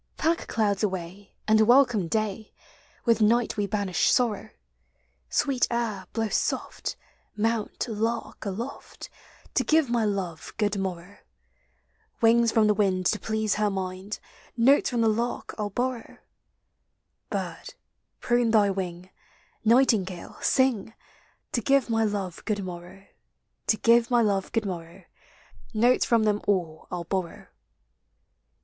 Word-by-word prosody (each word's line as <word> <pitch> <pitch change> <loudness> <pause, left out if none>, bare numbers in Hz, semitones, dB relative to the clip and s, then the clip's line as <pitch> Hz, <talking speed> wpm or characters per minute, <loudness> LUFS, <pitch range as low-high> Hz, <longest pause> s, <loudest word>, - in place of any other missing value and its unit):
Pack 330 +2 0
clouds 205 -3 0
away, 190 -1 -4
and 215 0 +5
welcome 240 -5 +4
day. 215 +2 -2 0.5
With 230 -2 +3
night 230 +2 +3
we 205 -1 -1
banish 200 -3 +1
sorrow; 235 -5 +1 0.8
Sweet 265 -3 +1
air, 220 -6 -2
blow 225 -1 -1
soft; - - -2 0.4
mount, 225 +2 -1
lark, 225 +1 -3
aloft. 220 +7 -6 0.4
To - - +2
give 315 -5 +2
my 235 -2 +2
love 195 -6 -3
good 210 -1 +1
morrow. 185 0 -5 1.0
Wings 230 0 +4
from 225 -1 +4
the 210 - +4
wind 190 -3 +1
to 215 - +2
please 220 -1 -1
her 210 - +3
mind, 190 +1 -4 0.4
Notes 265 +5 +4
from 240 -2 0
the 225 - +3
lark 230 +3 -1
1 210 - 0
'11 205 - -6
borrow: 250 -1 -3 1.1
Bird, - - -5 0.5
prune 240 -1 +2
thy 210 -3 +4
wing; 185 -1 -5 0.5
nightingale, 220 -7 +2 0.2
ring, 240 -5 +1 0.6
To 240 - 0
give 270 0 +2
my 225 0 +2
love 200 -5 -3
good 205 -2 -1
morrow. 180 +2 -9 0.6
To 215 - +3
give 230 +1 +4
my 240 -2 +4
love 200 -3 0
good 225 -2 0
morrow. 175 0 -6 0.7
Notes 240 +4 +4
from 230 -2 +3
them 210 -1 +1
all 175 -6 -1
1 180 - -4
'II - - -8
borrow. 185 -3 -3
215 Hz, 135 wpm, -26 LUFS, 195-235 Hz, 1.1 s, and